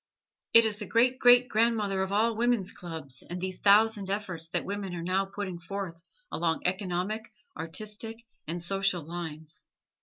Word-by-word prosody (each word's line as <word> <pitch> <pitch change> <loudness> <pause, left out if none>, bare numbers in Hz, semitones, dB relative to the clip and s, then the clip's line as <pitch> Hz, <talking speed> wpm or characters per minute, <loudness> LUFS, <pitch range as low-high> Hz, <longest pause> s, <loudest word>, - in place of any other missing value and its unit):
It 230 0 +9
is 215 -2 +1
the 210 -2 -6
great 250 +3 +3
great 245 0 +7
grandmother 215 -4 +1
of 190 0 -2
all 220 +3 +2
woman's 230 -4 +1
clubs 160 -6 -7
and 175 +1 -4
these 185 0 -4
thousand 205 -1 +4
efforts 190 -5 -3
that - - -1
women 200 -2 -4
are 170 - -5
now 185 +2 +1
putting 195 -2 -5
forth 175 -1 -6 0.3
along 165 -1 0
economic, 185 +4 -1 0.2
artistic 215 +7 -5 0.2
and 170 +2 -4
social 195 -1 0
lines. 160 -1 -7
195 Hz, 155 wpm, -29 LUFS, 175-215 Hz, 0.3 s, It